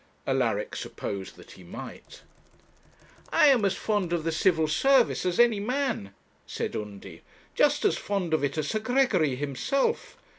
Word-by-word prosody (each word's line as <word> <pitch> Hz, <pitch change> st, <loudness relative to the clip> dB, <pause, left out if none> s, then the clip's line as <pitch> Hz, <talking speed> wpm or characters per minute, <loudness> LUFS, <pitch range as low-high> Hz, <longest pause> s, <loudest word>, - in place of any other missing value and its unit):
Alaric -, -, 0 dB
supposed 95 Hz, -1 st, -6 dB
that -, -, -15 dB
he 95 Hz, -, -14 dB
might. 85 Hz, -, -10 dB, 1.1 s
'I -, -, +5 dB
am 255 Hz, -6 st, +4 dB
as 190 Hz, -1 st, +1 dB
fond 205 Hz, -4 st, -1 dB
of 170 Hz, -2 st, -1 dB
the 165 Hz, -, -1 dB
Civil 160 Hz, -1 st, +2 dB
Service 245 Hz, -, +3 dB
as 180 Hz, +3 st, -1 dB
any 235 Hz, -3 st, +5 dB
man,' 245 Hz, -, -2 dB, 0.4 s
said -, -, -4 dB
Undy; 105 Hz, -2 st, -7 dB, 0.3 s
'just -, -, +2 dB
as -, -, +2 dB
fond 195 Hz, -5 st, -2 dB
of 155 Hz, -, +1 dB
it 140 Hz, +2 st, -1 dB
as 155 Hz, -1 st, -1 dB
Sir 215 Hz, -, 0 dB
Gregory 215 Hz, -, +2 dB
himself. 145 Hz, -, -1 dB
180 Hz, 155 wpm, -27 LUFS, 145-235 Hz, 1.1 s, I